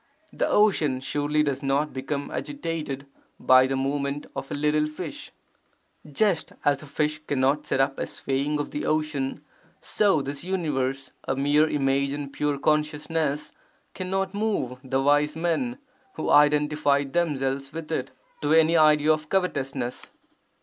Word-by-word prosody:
The -, -, 0 dB
ocean 160 Hz, -11 st, +3 dB
surely 145 Hz, +3 st, 0 dB
does 140 Hz, -2 st, -1 dB
not 140 Hz, +2 st, 0 dB
become 140 Hz, +2 st, -4 dB
agitated 165 Hz, -, -4 dB, 0.3 s
by 130 Hz, 0 st, +6 dB
the 135 Hz, -, -1 dB
movement 140 Hz, +1 st, -2 dB
of 135 Hz, -, -5 dB
a -, -, -3 dB
little 150 Hz, +1 st, +1 dB
fish. 155 Hz, +1 st, -7 dB, 0.8 s
[Just 180 Hz, +1 st, +1 dB
as 140 Hz, -1 st, +2 dB
a 155 Hz, -, -11 dB
fish 150 Hz, +1 st, -1 dB
cannot 140 Hz, +1 st, +1 dB
set -, -, 0 dB
up 135 Hz, 0 st, +1 dB
a -, -, -2 dB
swaying 140 Hz, +2 st, -2 dB
of 145 Hz, -, -3 dB
the 145 Hz, -, -3 dB
ocean, 150 Hz, -3 st, -1 dB, 0.4 s
so 195 Hz, -9 st, +2 dB
this 140 Hz, +2 st, -5 dB
universe, 135 Hz, -8 st, -2 dB
a 135 Hz, -, -1 dB
mere 145 Hz, +3 st, +3 dB
image 140 Hz, -1 st, +1 dB
in 145 Hz, -1 st, -5 dB
pure 145 Hz, 0 st, -1 dB
Consciousness, 150 Hz, 0 st, 0 dB, 0.4 s
cannot 190 Hz, +1 st, -2 dB
move 200 Hz, -, -1 dB
the 135 Hz, 0 st, 0 dB
wise 145 Hz, +1 st, +3 dB
men 175 Hz, +10 st, -1 dB, 0.4 s
who 155 Hz, -, -2 dB
identify 150 Hz, -1 st, +4 dB
themselves 135 Hz, -3 st, -1 dB
with 165 Hz, -1 st, -7 dB
it, 130 Hz, -, -2 dB, 0.3 s
to 150 Hz, +2 st, +3 dB
any 160 Hz, +1 st, +5 dB
idea 155 Hz, -1 st, +5 dB
of 155 Hz, 0 st, -5 dB
covetousness. 135 Hz, -9 st, -2 dB
150 Hz, 145 wpm, -25 LUFS, 135-155 Hz, 0.8 s, by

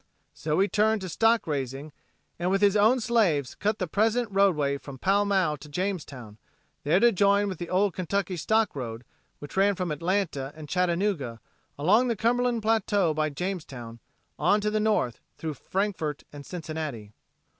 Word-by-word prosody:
So 155 Hz, +1 st, -1 dB
he 195 Hz, -, +4 dB
turned 215 Hz, 0 st, +2 dB
to 185 Hz, -, -5 dB
stock 225 Hz, +5 st, +2 dB
raising 140 Hz, 0 st, -4 dB, 0.5 s
and 175 Hz, +1 st, 0 dB
with 195 Hz, +1 st, +1 dB
his 205 Hz, 0 st, +4 dB
own 220 Hz, +5 st, +4 dB
slaves 205 Hz, -, +1 dB
cut 210 Hz, +1 st, -1 dB
the 185 Hz, -, -1 dB
present 220 Hz, +6 st, +1 dB
roadway 155 Hz, -8 st, +2 dB
from 140 Hz, -1 st, -10 dB
Pall 200 Hz, +8 st, +2 dB
Mall 185 Hz, -7 st, +1 dB
to 145 Hz, +1 st, -13 dB
Jamestown, 145 Hz, -, -4 dB, 0.4 s
there 160 Hz, +6 st, +3 dB
to 240 Hz, +2 st, +5 dB
join 200 Hz, 0 st, +3 dB
with 185 Hz, -4 st, -5 dB
the 175 Hz, -, -5 dB
old 190 Hz, 0 st, +2 dB
Kentucky 185 Hz, +1 st, -2 dB
Stock 215 Hz, +4 st, +1 dB
road 120 Hz, -3 st, -5 dB, 0.3 s
which 145 Hz, -, -10 dB
ran 200 Hz, +1 st, +3 dB
from 180 Hz, -3 st, -3 dB
Atlanta 165 Hz, -4 st, -1 dB
and 155 Hz, -1 st, -9 dB
Chattanooga, 175 Hz, -, 0 dB, 0.4 s
along 205 Hz, -, +3 dB
the 235 Hz, -, 0 dB
Cumberland 235 Hz, +1 st, +1 dB
plateau 205 Hz, -6 st, +2 dB
by 155 Hz, 0 st, 0 dB
Jamestown 140 Hz, -9 st, -5 dB, 0.4 s
on 205 Hz, -, +3 dB
to 210 Hz, 0 st, 0 dB
the 215 Hz, -, +1 dB
north 210 Hz, -, +1 dB, 0.2 s
through 160 Hz, -1 st, -4 dB
Frankfort 180 Hz, -1 st, -3 dB
and 145 Hz, -1 st, -10 dB
Cincinnati. 155 Hz, -, -6 dB
185 Hz, 165 wpm, -27 LUFS, 150-205 Hz, 0.5 s, to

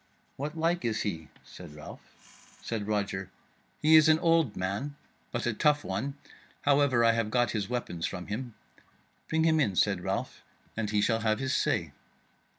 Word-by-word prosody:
"What 150 Hz, +4 st, -5 dB
like 170 Hz, +2 st, +1 dB
is 110 Hz, -2 st, -1 dB
he?" 80 Hz, -7 st, -4 dB, 0.2 s
said 85 Hz, -5 st, -12 dB
Ralph. 75 Hz, -, -15 dB
Said 110 Hz, -3 st, -3 dB
Roger 100 Hz, -3 st, -2 dB, 0.5 s
"He 155 Hz, +1 st, +7 dB
is 155 Hz, 0 st, +7 dB
an 155 Hz, -, +6 dB
old 165 Hz, -8 st, +2 dB
man, 100 Hz, +10 st, -3 dB, 0.4 s
but 120 Hz, -, -2 dB
a 120 Hz, -, +1 dB
tough 145 Hz, +6 st, +2 dB
one; 140 Hz, +1 st, -3 dB, 0.5 s
however, 140 Hz, -4 st, +4 dB
I 115 Hz, -, +6 dB
have 115 Hz, -1 st, 0 dB
got 120 Hz, +1 st, +2 dB
his 105 Hz, -2 st, -2 dB
weapons 105 Hz, -9 st, -2 dB
from 90 Hz, -, -6 dB
him." 115 Hz, +3 st, -5 dB, 0.7 s
"Bring 160 Hz, 0 st, +2 dB
him 160 Hz, -1 st, +3 dB
in," 105 Hz, -10 st, +1 dB
said 100 Hz, -1 st, +2 dB
Ralph, -, -, -3 dB, 0.3 s
"and 110 Hz, -2 st, -2 dB
he 105 Hz, -1 st, +1 dB
shall 115 Hz, +1 st, +2 dB
have 110 Hz, -1 st, +1 dB
his 130 Hz, -1 st, -1 dB
say." -, -, 0 dB
115 Hz, 170 wpm, -29 LUFS, 105-145 Hz, 0.7 s, He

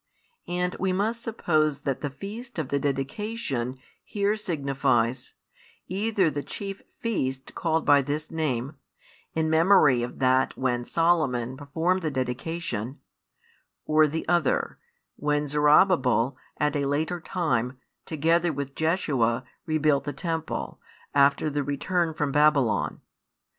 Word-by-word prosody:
And 180 Hz, +1 st, -1 dB
we 190 Hz, -1 st, +1 dB
must 215 Hz, +5 st, 0 dB
suppose 155 Hz, -10 st, 0 dB
that 135 Hz, -3 st, -2 dB
the 145 Hz, -, -2 dB
feast 210 Hz, -, -8 dB
of 155 Hz, -5 st, -2 dB
the 140 Hz, -, +1 dB
dedication 140 Hz, -, -2 dB, 0.3 s
here 205 Hz, 0 st, 0 dB
signifies, 135 Hz, -, 0 dB, 0.5 s
either 195 Hz, -3 st, +1 dB
the 145 Hz, 0 st, -3 dB
chief 195 Hz, +7 st, -6 dB, 0.2 s
feast 135 Hz, -, -2 dB
[called 160 Hz, -2 st, 0 dB
by 145 Hz, -1 st, +6 dB
this 145 Hz, +3 st, -3 dB
name], 145 Hz, -3 st, -2 dB, 0.6 s
in 160 Hz, -1 st, +1 dB
memory 160 Hz, -6 st, +5 dB
of 120 Hz, +1 st, -5 dB
that 130 Hz, 0 st, +2 dB
when 125 Hz, -2 st, 0 dB
Solomon 135 Hz, -8 st, +1 dB
performed 160 Hz, +7 st, -1 dB
the 160 Hz, -, -1 dB
dedication; 130 Hz, -1 st, -3 dB, 0.9 s
or 155 Hz, 0 st, +4 dB
[the 160 Hz, +2 st, -4 dB
other], 170 Hz, -4 st, +1 dB, 0.4 s
when 145 Hz, 0 st, 0 dB
Zorobabel 145 Hz, -, +4 dB, 0.2 s
at 150 Hz, -1 st, +1 dB
a 140 Hz, -1 st, 0 dB
later 155 Hz, +5 st, -1 dB
time, 130 Hz, -9 st, -1 dB, 0.3 s
together 165 Hz, +2 st, +2 dB
with 140 Hz, -2 st, -5 dB
Jeshua, 140 Hz, -8 st, +1 dB, 0.2 s
rebuilt 155 Hz, -3 st, +2 dB
the 145 Hz, -, -3 dB
temple, 165 Hz, +3 st, -4 dB, 0.3 s
after 140 Hz, +1 st, +4 dB
the 145 Hz, -1 st, -1 dB
return 160 Hz, +4 st, -1 dB
from 150 Hz, -2 st, -1 dB
Babylon. 145 Hz, -5 st, +2 dB
150 Hz, 125 wpm, -26 LUFS, 135-170 Hz, 0.9 s, by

